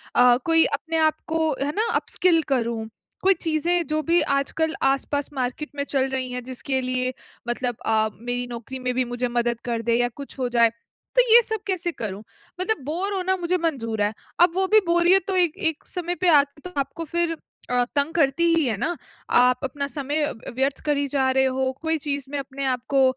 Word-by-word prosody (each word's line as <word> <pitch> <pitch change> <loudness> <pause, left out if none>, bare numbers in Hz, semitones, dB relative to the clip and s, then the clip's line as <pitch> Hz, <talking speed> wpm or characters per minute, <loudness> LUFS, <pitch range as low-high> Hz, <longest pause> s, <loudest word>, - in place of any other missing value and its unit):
अ, 245 0 +6
कोई 325 -1 +6
अपने 325 +3 -2
आपको 315 0 +1
है 285 - -1
ना 440 +2 +1
अपस्किल 345 -3 +2
करूँ। 230 -3 -1 0.3
कोई 385 +1 +5
चीज़ें 335 +2 +1
जो 310 0 0
भी 340 +1 +3
आजकल 315 +3 0
आस-पास 275 +1 0
मार्केट 260 +3 -3
में 280 - -2
चल 270 -2 0
रही 260 -1 -3
है 250 0 -3
जिसके 260 +1 -3
लिए 255 0 -1 0.4
मतलब 245 0 -1
अ, 220 -1 +2
मेरी 245 +2 -4
नौकरी 240 +3 -6
में 250 0 -1
भी 255 - +2
मुझे 245 +1 -2
मदद 240 -1 -1
कर 235 -2 -2
दे 230 0 +1
या 245 - +2
कुछ 280 -1 -10
हो 250 -1 -1
जाए। 235 -1 +4 0.4
तो - - +7
ये 475 - +10
सब 440 0 -2
कैसे 360 -3 -1
करूँ? 210 - -5 0.4
मतलब 405 -6 0
बोर 360 +7 -2
होना 375 0 0
मुझे 355 0 0
मंज़ूर 245 -11 -2
है, 205 +1 +1 0.3
अब 350 0 +6
वो 380 0 +2
भी 435 - +9
बोरियत 345 +2 +4
तो 385 - 0
एक 345 -3 +3
एक 320 - -7
समय 355 -1 -4
पे 365 - +2
आके 290 -2 +3
तो - - -16
आपको 280 +4 -4
फिर 340 +1 0 0.4
अ, 245 0 +3
तंग 285 +3 +1
करती 320 +1 +2
ही 325 -3 +2
है 225 -5 -1
ना। 345 - -1 0.4
आप 250 0 +4
अपना 280 +1 -3
समय 290 +1 -2
व 225 - -9
व्यर्थ 265 +1 0
करी 285 -1 +1
जा 265 -1 +1
रहे 265 0 +3
हो, 260 0 0
कोई 320 0 0
चीज़ 285 -2 -2
में 290 - -2
अपने 275 0 -5
आपको 260 +1 0
280 Hz, 205 wpm, -23 LUFS, 250-330 Hz, 0.4 s, ये